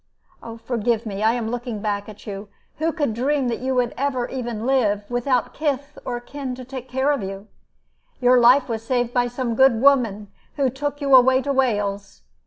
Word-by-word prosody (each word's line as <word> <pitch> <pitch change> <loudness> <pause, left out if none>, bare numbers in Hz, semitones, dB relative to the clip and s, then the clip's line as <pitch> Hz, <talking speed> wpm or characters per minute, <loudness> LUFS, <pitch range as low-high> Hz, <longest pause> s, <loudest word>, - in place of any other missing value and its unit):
"Forgive 235 -1 -1
me. 200 -2 -5
I 220 +1 +3
am 230 -2 -3
looking 240 -3 -4
back 205 0 -3
at 210 - -13
you. 200 0 -7 0.3
Who 325 +1 +1
could 290 -8 -1
dream 265 +2 0
that 230 - -2
you 260 +1 -1
would 245 -2 +1
ever 260 -3 -1
even 240 -4 -4
live, 220 -6 +2
without 245 0 0
kith 285 -1 -3
or 245 -1 -3
kin 260 +1 -6
to 255 0 -9
care 265 +2 -1
for 265 - -5
you? 195 +1 -6 0.7
Your 250 0 +5
life 250 +3 +5
was 225 -2 -4
saved 245 0 -1
by 245 -1 +2
some 245 -1 -3
good 265 -1 +4
woman 230 -7 +2 0.2
who 275 -4 +1
took 290 +3 -4
you 275 -1 +1
away 260 +1 +5
to 280 - -1
Wales. 205 -6 -1
245 Hz, 190 wpm, -22 LUFS, 225-265 Hz, 0.7 s, Your